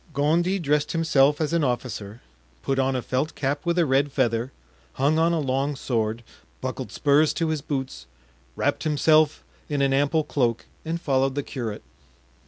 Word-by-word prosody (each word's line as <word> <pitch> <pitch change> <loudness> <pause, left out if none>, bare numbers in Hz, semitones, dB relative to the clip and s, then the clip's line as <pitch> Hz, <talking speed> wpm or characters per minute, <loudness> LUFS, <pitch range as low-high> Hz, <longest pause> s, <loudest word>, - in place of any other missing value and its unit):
Gondy 170 +7 +2
dressed 150 -4 0
himself 150 -3 +3
as 155 0 -1
an 170 -2 +2
officer, 120 -4 -3 0.4
put 135 0 0
on 135 0 +1
a 125 - -2
felt 130 +5 -2
cap 140 +1 -2
with 170 +1 +1
a 170 - +4
red 140 +1 +2
feather, 120 -1 0 0.4
hung 145 +4 +2
on 165 +1 +3
a 170 - +1
long 140 +1 -1
sword, 115 -3 -2 0.4
buckled - - -5
spurs 145 +2 +3
to 165 -1 -1
his 155 -2 -1
boots, 130 - -4 0.5
wrapped - - 0
himself 155 0 +3 0.3
in 145 -2 -1
an 135 0 +2
ample 145 +3 +2
cloak 120 -6 -1 0.2
and 165 +1 -3
followed 135 -3 +1
the 145 - -1
curate. 115 -6 -5
140 Hz, 170 wpm, -24 LUFS, 130-155 Hz, 0.5 s, a